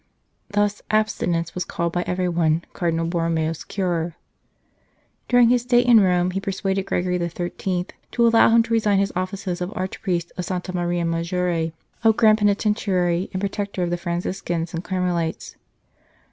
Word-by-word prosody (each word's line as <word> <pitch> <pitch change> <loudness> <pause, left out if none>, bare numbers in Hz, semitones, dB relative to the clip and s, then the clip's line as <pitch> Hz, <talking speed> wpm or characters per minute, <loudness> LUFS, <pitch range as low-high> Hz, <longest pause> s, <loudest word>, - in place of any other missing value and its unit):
Thus, 205 0 0
abstinence 175 -6 0
was 180 - -2
called 170 -1 -3
by 175 - 0
everyone 170 -3 +1
" - - -36
Cardinal 165 -1 -1
Borromeo 165 -2 0
s 165 - -7
cure." 175 -4 -2 1.1
During 245 -2 +5
his 245 0 +3
stay 245 0 +3
in 245 -2 +6
Rome, 180 -2 +2
he 195 - -2
persuaded 195 -1 -2
Gre 180 - 0
gory 180 0 -1
XIII. 175 +1 -2 0.3
to 235 - +3
allow 230 0 +6
him 230 0 +5
to 230 0 -3
resign 215 -3 +3
his 195 0 0
offices 185 -1 -3
of 180 +2 -3
Archpriest 180 -2 -2
of 180 - -3
Santa 185 0 -4
Maria 175 -1 0
Maggiore, 165 0 -1 0.3
of 220 -1 +4
Grand 220 -2 +5
Penitentiary 200 -4 +1
and 185 - -3
Protector 200 -1 -2
of 175 - -1
the - - +1
Franciscans 175 -1 -3
and 165 +1 -4
Carmelites. 180 -4 -2
180 Hz, 160 wpm, -23 LUFS, 170-200 Hz, 1.1 s, in